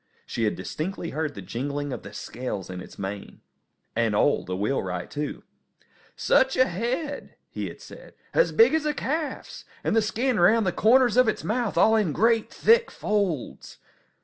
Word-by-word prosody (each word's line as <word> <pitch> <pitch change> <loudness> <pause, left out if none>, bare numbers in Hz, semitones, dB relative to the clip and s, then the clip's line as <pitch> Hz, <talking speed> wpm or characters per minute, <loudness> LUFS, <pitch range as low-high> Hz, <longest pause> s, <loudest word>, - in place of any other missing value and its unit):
She 115 - -2
had 105 - 0
distinctly 170 +1 -5
heard 155 0 -3
the 100 - -8
jingling 140 +7 -3
of - - -6
the - - -10
scales 115 -7 -6
in 90 0 -6
its - - -12
mane. 100 +1 -6 0.5
And - - +1
Ole, - - +2
the 90 - -3
wheelwright, 95 -5 -2
too. 150 0 -4 0.7
"Such 265 0 +2
a 255 - +6
head!" 255 - -3 0.2
he - - -4
had - - -10
said. - - -13 0.2
"As - - +3
big 455 -6 +5
as 315 -1 +1
a 300 - 0
calf's! 305 +2 -4 0.2
And - - 0
the 225 - +5
skin 230 +2 0
round 215 +5 +5
the 185 - +2
corners 240 +4 +4
of 255 -2 +6
its 215 - -1
mouth 235 0 -1
all 220 - +5
in 205 -9 +1
great, 225 +3 +2
thick 465 +1 +4
folds!" 200 - -2
210 Hz, 175 wpm, -25 LUFS, -, 0.7 s, a